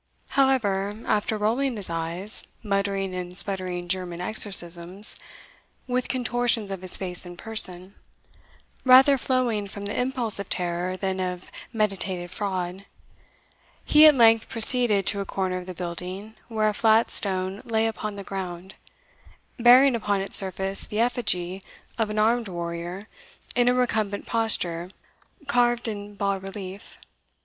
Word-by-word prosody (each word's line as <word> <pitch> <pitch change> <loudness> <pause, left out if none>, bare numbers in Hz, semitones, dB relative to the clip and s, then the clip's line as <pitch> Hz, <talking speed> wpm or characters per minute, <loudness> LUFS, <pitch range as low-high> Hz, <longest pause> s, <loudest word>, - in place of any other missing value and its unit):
However, 210 -7 0
after 215 +1 -1
rolling 235 +4 -1
his 200 - -6
eyes, 170 +5 -4 0.2
muttering 200 -2 -2
and 180 0 -6
sputtering 185 -3 -3
German 180 -1 -1
exorcisms, 180 -1 +3 0.7
with 250 0 -2
contortions 245 -4 -1
of 190 -2 -6
his 185 -1 +6
face 180 -2 -1
and 175 -1 -7
person, 190 -4 0 0.9
rather 265 +2 +6
flowing 245 -6 -1
from 200 +1 -9
the 205 - -1
impulse 250 -4 +1
of 200 - -7
terror 180 +1 -3
than 190 0 -3
of 180 -1 -5 0.2
meditated 190 -5 -2
fraud, 185 -1 -5 1.0
he 305 +1 +7
at 300 - +6
length 225 -2 +4
proceeded 225 -3 +7
to 200 - +3
a - - -2
corner 185 -1 -3
of 180 - -11
the 185 - -8
building 180 +4 -6
where 220 -2 -1
a - - -3
flat 220 +1 +2
stone 190 0 0
lay 225 -1 -1
upon 215 -2 -4
the 200 - -7
ground, 190 -1 -7 0.9
bearing 250 +3 +6
upon 205 -4 -1
its 195 - -5
surface 190 0 +2
the 210 - -5
effigy 195 -6 -1 0.4
of 220 -2 0
an 210 - -5
armed 230 +2 +1
warrior 175 +2 -6 0.5
in 245 0 +3
a - - +2
recumbent 220 -5 -1
posture 180 -7 -1 0.6
carved 240 -3 +1
in 205 -1 -7
bas 200 -1 -2
relief. 195 +1 -9
200 Hz, 140 wpm, -24 LUFS, 185-225 Hz, 1.0 s, he